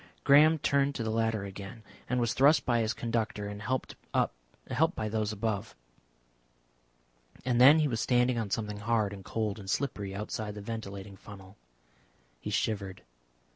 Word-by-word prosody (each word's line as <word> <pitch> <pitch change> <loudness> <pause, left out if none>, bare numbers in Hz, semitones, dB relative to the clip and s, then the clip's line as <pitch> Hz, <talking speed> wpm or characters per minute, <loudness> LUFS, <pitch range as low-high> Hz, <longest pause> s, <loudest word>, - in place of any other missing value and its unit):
Graham 150 +3 +6
turned 140 -1 +1
to 115 - -2
the 110 - -2
ladder 110 -2 0
again, 100 +3 -9 0.3
and 125 +1 +1
was 120 -2 +1
thrust 145 +4 +4
by 120 -2 +2
his 110 -1 +1
conductor 115 -3 -2
and 105 0 -7
helped 130 +3 -2 0.2
up - - +2 0.6
by 110 - -2
those 110 0 -1
above, 110 0 -3 1.7
and 125 -1 +2
then 140 +5 +9
he 155 -1 +3
was 115 -5 -2
standing 125 -1 +2
on 110 -3 -3
something 105 +1 -2
hard 110 -2 0
and 100 -1 -9
cold 110 0 -2
and 95 -2 -9
slippery 100 -7 -2
outside 105 0 -4
the - - -7
ventilating 100 -3 -7
funnel. 95 -1 -13 0.8
He - - -6
shivered. 100 -3 -2
110 Hz, 160 wpm, -30 LUFS, 100-120 Hz, 1.7 s, then